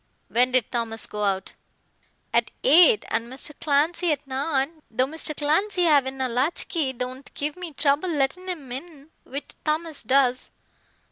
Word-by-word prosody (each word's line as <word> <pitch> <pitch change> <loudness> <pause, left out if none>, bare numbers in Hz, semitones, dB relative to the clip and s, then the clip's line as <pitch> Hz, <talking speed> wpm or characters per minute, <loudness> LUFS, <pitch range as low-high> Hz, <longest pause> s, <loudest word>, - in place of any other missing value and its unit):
"When 250 +2 +2
did 255 -4 +2
Thomas 230 -2 -2
go 210 0 -5
out?" 195 -2 -1 0.8
"At - - +2
eight, 355 - +6
and 230 +2 -2
Mr. 265 +3 -1
Clancy 320 +4 +1
at 290 -1 -2
nine, 275 +3 -2
though 255 +3 +2
Mr. 305 +1 0
Clancy 355 +6 +1
havin' 275 -5 +3
a 260 - +1
latch 255 +7 0
key, 310 -7 0
don't 255 +1 -6
give 295 +1 -2
me 360 -2 -7
trouble 285 +5 +1
lettin' 325 +5 -1
him 295 -8 -6
in 295 +2 -8
which 280 +2 -7
Thomas 310 0 -1
does." 255 +1 +2
280 Hz, 155 wpm, -24 LUFS, 255-320 Hz, 0.8 s, eight